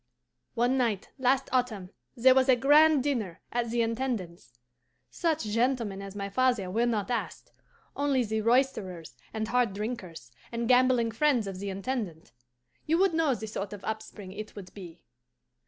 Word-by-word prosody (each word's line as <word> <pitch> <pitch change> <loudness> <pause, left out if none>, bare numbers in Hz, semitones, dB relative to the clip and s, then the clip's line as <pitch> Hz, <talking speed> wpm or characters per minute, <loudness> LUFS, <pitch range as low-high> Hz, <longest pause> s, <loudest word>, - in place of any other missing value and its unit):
"One 245 +3 +2
night 225 -6 -1
last 260 +1 +2
autumn 225 -8 -1 0.3
there 255 +2 +6
was 265 0 +3
a 260 - +7
grand 290 +2 +5
dinner 230 -12 -2
at 240 -1 -1
the 235 0 +1
Intendance. 225 - -4 0.5
Such 320 -4 0
gentlemen 225 -2 0
as 195 0 -8
my 200 -1 -3
father 230 -3 +1
were 230 +4 +1
not 220 -1 -1
asked; 240 - -4 0.4
only 280 -3 +1
the 220 -1 -2
roisterers 210 - 0 0.2
and 220 0 -3
hard 245 -5 +2
drinkers, 195 - -6 0.2
and 235 0 -2
gambling 250 -2 +4
friends 250 -1 +2
of 195 -2 -6
the 200 0 -4
Intendant. 195 - -4 0.6
You 325 +2 +3
would 380 -1 +3
know 320 -5 +2
the 220 - -6
sort 205 -2 -5
of 205 - -9
upspring 215 -3 -6
it 215 +2 -8
would 190 -3 -10
be. 175 -4 -11
230 Hz, 160 wpm, -28 LUFS, 200-255 Hz, 0.6 s, a